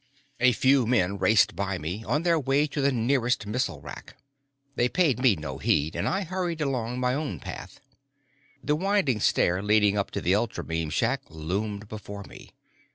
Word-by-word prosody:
A 125 +1 +5
few 130 0 +3
men 100 -5 +1
raced 105 +4 +4
by 95 -1 -2
me, 90 +7 -5
on 150 +3 0
their 170 -2 +3
way 140 +1 +2
to 145 -1 -3
the 140 +1 +3
nearest 125 -1 +1
missile 105 - -2
rack. - - -10 0.6
They 120 - +2
paid 160 -7 +2
me 130 -6 +4
no 75 -4 -6
heed, 75 +3 +1
and 85 +5 -1
I 195 +1 -1
hurried 175 -2 -3
along 125 -4 -2
my 125 0 +1
own 140 - -3
path. - - -9 0.8
The 150 - +1
winding 185 - +1
stair 90 -2 +2
leading 105 0 +3
up 100 - -2
to - - -4
the 90 - +2
ultrabeam 80 -7 -2
shack 75 - 0
loomed 100 +7 -4
before 100 -1 -8
me. - - -13
110 Hz, 175 wpm, -26 LUFS, 95-140 Hz, 0.8 s, A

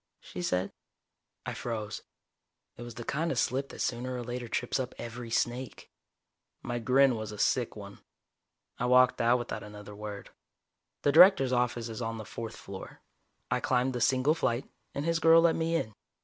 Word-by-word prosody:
she 90 - -8
said. 90 +2 0 0.7
I - - -3
froze. 110 -3 -4 0.7
It - - -11
was 120 -1 -8
the 120 - -6
kind 160 +7 -1
of - - -2
slip 135 +2 0
that - - -8
sooner 125 +1 -2
or 125 - -4
later 120 0 -5
trips 120 +3 -1
up 130 -1 -4
every 120 0 -7
snake. 120 +2 -2 0.7
My 120 0 -3
grin 130 +2 +4
was 110 -1 -5
a 105 - -8
sick 120 +3 +1
one. 100 -1 -10 0.8
I 125 - 0
walked 125 0 +5
out 120 +2 +4
without 120 -1 -5
another 105 0 -10
word. 105 -1 -7 0.7
The 145 - +4
Director's 160 -5 +7
office 120 -1 0
is 115 +1 -6
on 115 -1 -3
the 110 - -7
fourth 115 +1 -6
floor, 95 -1 -10 0.5
I - - +2
climbed 130 0 +1
the 125 - -3
single 130 +4 +3
flight, 135 -5 -1 0.3
and 140 - -2
his 165 0 +1
girl 165 -1 +7
let 165 -1 +4
me 165 0 0
in. 110 -10 -1
120 Hz, 180 wpm, -30 LUFS, 115-130 Hz, 0.8 s, Director's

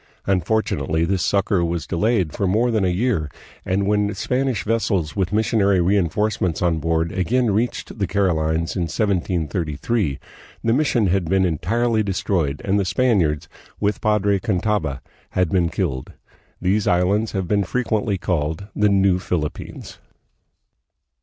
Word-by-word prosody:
Unfortunately, 90 -4 0
this 90 0 0
succor 100 -2 +1
was 85 -1 -2
de - - -4
layed 95 -4 +1
for 100 - -1
more 115 +6 +2
than 110 -3 +1
a - - +2
year, 90 -4 0 0.3
and 95 +1 0
when 105 0 +1
Spanish 125 -2 -1
vessels 105 -7 0
with 95 -3 0
missionary 105 -3 +2
reinforcements 95 0 +1
on 85 -3 +1
board 80 +1 0
again 115 +5 +1
reached 115 +1 -2
the 100 - 0
Carolines 85 -4 0
in 90 -3 0
1733, 85 - -1 0.5
the 115 - +2
mission 130 -5 +2
had 95 -1 +1
been 95 +3 +2
entirely 110 +8 +1
de 100 -2 -1
stroyed 80 -7 -1
and 100 +1 +2
the - - +2
Spaniards, 95 - +1 0.3
with 105 0 0
Padre 105 -2 +2
Cantava, 100 - -1 0.3
had 90 -2 +1
been 90 -2 +2
killed. 65 -5 -3 0.5
These 100 +3 +1
islands 100 +5 +2
have 95 -3 -2
been 100 +2 +2
frequently 110 -1 -1
called 80 0 -2
the 105 0 +3
"New 95 -2 +3
Philippines." 80 -5 -4
95 Hz, 145 wpm, -21 LUFS, 85-105 Hz, 0.5 s, the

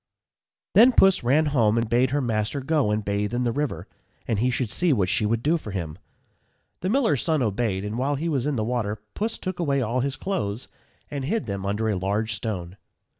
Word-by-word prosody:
_ - - -62 0.7
Then 245 +4 +7
Puss 195 -3 +5
ran 140 +6 +3
home 115 -4 +3
and 115 0 +1
bade 120 +3 +2
her 145 +2 0
master 110 +2 -1
go 145 -4 +1
and 105 0 -1
bathe 105 +3 -1
in 125 - 0
the 120 - +1
river, 145 +3 -3 0.4
and 110 - 0
he 125 +3 +2
should 125 -3 -1
see 180 -2 +2
what 100 -9 +2
she 105 - +1
would 115 +1 0
do 160 +3 +3
for 110 - -8
him. 85 -4 -5 0.8
The 185 - -2
miller's 225 - +2
son 155 -5 +1
obeyed; 105 -3 -1
and 105 +3 -3
while 140 +3 +1
he 155 +5 -3
was 140 -4 0
in 150 - 0
the 110 - 0
water, 110 -3 -2
Puss 220 +2 -2
took 185 -2 -5
away 140 -5 +1
all 125 0 0
his 135 +2 -1
clothes, 130 - -3 0.4
and 140 -2 -3
hid 210 - -1
them 100 -2 -4
under 105 +3 -1
a 105 - +1
large 105 +4 -1
stone. 100 -4 -4
120 Hz, 225 wpm, -25 LUFS, 105-145 Hz, 0.8 s, Then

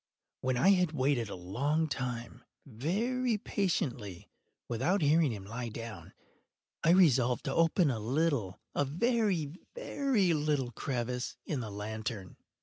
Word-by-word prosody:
When 130 -1 0
I 135 +10 +5
had 180 -4 +4
waited 130 -5 +1
a - - -5
long 140 - 0
time, 125 -3 -4 0.2
very 215 - 0
patiently, 130 - -2 0.4
without 150 - +1
hearing 150 -1 +4
him 100 -3 -6
lie 115 +3 -4
down, 115 0 -8 0.7
I 165 - +4
resolved 135 -9 +4
to 135 - -1
open 165 -1 +3
a 115 - -2
little—a 130 - -1
very, 185 - +1 0.2
very 270 - +1
little 145 -5 0
crevice 125 0 -3
in 150 - -2
the 115 -3 -4
lantern. 105 -1 -5
135 Hz, 130 wpm, -31 LUFS, 115-170 Hz, 0.7 s, I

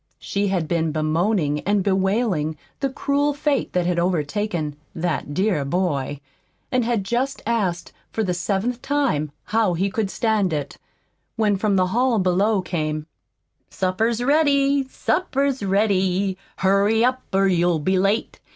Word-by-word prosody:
She 200 +1 -2
had 180 -5 0
been 165 -1 0
bemoaning 155 0 +1
and 200 +4 +1
bewailing 190 -5 0 0.2
the 275 - 0
cruel 285 +2 0
fate 290 -1 0
that 180 -1 +1
had 175 -1 +1
overtaken 170 -2 -1 0.2
"that 165 -3 -2
dear 190 -6 +1
boy," 145 -3 -1 0.5
and 255 -1 +2
had 230 -3 0
just 250 +7 -2
asked 200 -7 -1 0.2
for 220 - -1
the 180 -3 0
seventh 205 +7 -1
time 265 - 0
how 215 -5 +1
he 190 +4 0
could 210 -1 -1
stand 210 -5 +1
it, 145 -2 -4 0.6
when 215 -3 +2
from 200 +1 +1
the 185 -1 +3
hall 245 0 +2
below 190 +2 +2
came: 155 -3 -2 0.6
"Supper's 220 +6 0
ready, 280 -1 +3
supper's 280 -4 0
ready, 195 -1 +1 0.2
Hurry 200 +4 +3
up 255 +1 +1
or 195 +1 +3
you'll 175 -2 +2
be 185 +5 +1
late. 200 +4 0
195 Hz, 140 wpm, -22 LUFS, 175-230 Hz, 0.6 s, the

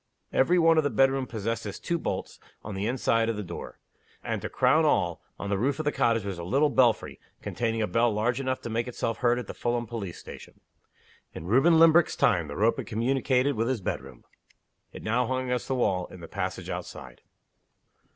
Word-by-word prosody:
Every 175 +7 +3
one 165 -1 +5
of - - +2
the 145 - +1
bedrooms 135 +2 +2
possessed 115 0 -3
its 100 - -6
two 170 0 -2
bolts - - -4 0.2
on 105 - -6
the 95 +2 -2
inner 125 +3 -1
side 115 -2 +2
of 115 - -1
the 105 - -3
door. 85 -2 -8 0.5
And, - - -3
to - - -4
crown - - +3
all, - - +1 0.2
on 100 - -5
the 100 - 0
roof 135 +4 0
of 155 - -4
the 150 - +2
cottage 115 -6 +1
was 95 -3 -4
a - - -5
little 140 - +2
belfry, 120 -5 +2 0.2
containing 110 +3 -1
a - - 0
bell 115 0 +2
large 115 +4 0
enough 130 -1 -2
to - - -6
make 115 +2 -1
itself 115 -2 -3
heard 120 -1 +2
at 125 - -4
the - - -7
Fulham 120 0 -1
police 105 -6 -6
station. - - -12 0.8
In 80 - -7
Reuben 135 - +4
Limbrick's 165 +1 +5
time 85 -7 +2
the 70 - -7
rope 110 +6 +2
had - - -5
communicated 130 +3 +1
with 115 +1 0
his 130 -2 0
bedroom. 65 -8 -5 0.7
It - - -10
hung 115 +3 +1
now 130 - -1
against 125 -1 -2
the 135 - -1
wall, 95 -7 0
in 90 - -12
the 85 - -9
passage - - -4
outside. 60 -2 -7
115 Hz, 215 wpm, -27 LUFS, 105-130 Hz, 0.8 s, one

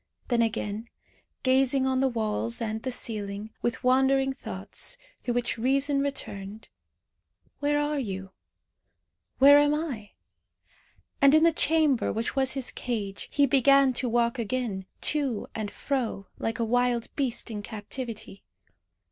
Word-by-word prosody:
Then 240 -2 +3
again, 220 0 -2 0.5
gazing 265 +1 +3
on 260 0 +1
the 270 - +3
walls 230 -1 -1
and 220 -1 -3
the 260 - -3
ceiling, 210 -2 -4
with 240 +3 -2
wandering 265 +1 +3
thoughts, - - -6 0.2
through 240 - -2
which 245 -1 -1
reason 275 +3 +2
returned. 215 -7 -5 0.9
"Where 290 0 +1
are 295 0 0
you? 190 -6 -5 1.1
Where 285 +2 +8
am 290 0 +3
I?" 265 -10 -5 1.1
And 275 +2 +7
in 310 - +5
the 335 - +6
chamber 310 -4 +2
which 225 +5 -2
was 265 -1 +2
his 265 -2 -3
cage 210 -5 -4
he 285 - +4
began 275 0 +5
to 250 0 0
walk 235 +1 +1
again, 220 -4 -2
to 275 -8 0
and 215 -2 -3
fro, 240 -6 -3
like 225 0 -2
a 230 - 0
wild 245 0 0
beast 250 -4 -1
in 210 -2 -4
captivity. 220 0 -7
245 Hz, 140 wpm, -27 LUFS, 220-275 Hz, 1.1 s, Where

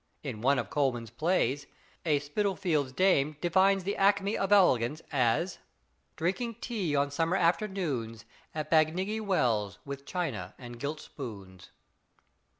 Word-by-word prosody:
In 125 -7 -5
one 135 +3 +3
of - - -3
Coleman's 120 -6 0
plays, 145 -1 0 0.4
a 150 -2 +3
Spitalfield's 160 -2 0
dame 150 -3 +2
defines 190 +3 +3
the 200 +2 -2
acme 200 +1 +3
of 195 0 -1
elegance 155 - +4
as: 145 +6 +1 0.6
"Drinking 215 +8 -1
tea 205 - -2
on 140 0 +1
summer 165 +5 +1
afternoons 165 - -1 0.3
At 155 -1 -4
Bagnigge 180 +7 +2
Wells 115 - +1
with 140 0 -7
china 125 - -3
and 120 -2 -10
gilt 150 +3 -3
spoons." 100 -9 -9
155 Hz, 130 wpm, -30 LUFS, 125-190 Hz, 0.6 s, elegance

